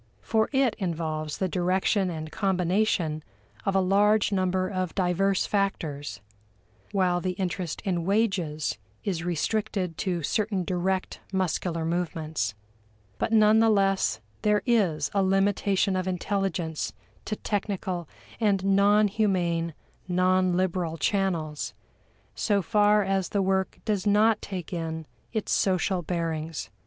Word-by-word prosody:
For 220 -1 +1
it 265 -4 +3
involves 155 -4 -2
the 190 - 0
direction 185 +2 +1
and 155 -2 -5
combination 180 -4 +1 0.4
of 195 - +1
a - - +5
large 205 +3 +3
number 185 -1 +1
of 185 -3 -3
diverse 190 +1 +1
factors, 145 - -2 0.7
while 180 -3 +2
the 185 0 -1
interest 180 -3 -3
in 175 -3 0
wages 180 - 0 0.2
is 175 -4 -2
restricted 180 0 -1
to 175 -4 -1
certain 200 +3 0
direct 185 +1 -1
muscular 175 -3 -1
movements. 160 -9 -2 0.6
But 225 - -1
none 215 0 +6
the 225 0 +5
less 195 - +2 0.2
there 210 -1 +2
is 190 - +2
a 200 - +2
limitation 195 0 +2
of 185 0 -1
intelligence 180 -3 -2 0.3
to 215 - -2
technical 190 -5 -3 0.3
and 200 -4 +2
non 200 +2 +5
humane, 175 -6 0 0.3
non 185 0 +2
liberal 180 -3 -1
channels, 170 -7 -1 0.6
so 200 -3 +1
far 210 0 +4
as 195 -2 0
the 200 - +1
work 190 0 0
does 210 -2 0
not 210 +1 +4
take 185 -3 -6
in 160 -1 -3 0.3
its 220 -3 -2
social 185 -1 +1
bearings. 165 -2 -3
185 Hz, 125 wpm, -27 LUFS, 170-200 Hz, 0.7 s, none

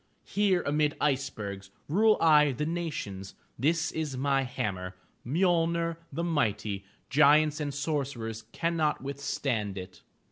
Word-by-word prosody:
Here 195 -4 +2
amid 150 +1 +1
icebergs, 110 -9 -2 0.2
Rule 215 +7 +4
I 150 -3 +5
the 150 +5 -2
nations; 145 - -4 0.2
This 160 +5 +1
is 150 -5 -3
my 135 +1 +2
hammer, 100 -8 -3 0.3
Mjolner, 170 +2 +1
the 170 - -3
mighty; 110 - -1 0.3
Giants 150 +2 +5
and 145 -1 -2
sorcerers 135 -6 -3
Cannot 165 -4 0
withstand 130 -7 -2
it! 90 0 -8
145 Hz, 115 wpm, -29 LUFS, 115-160 Hz, 0.3 s, I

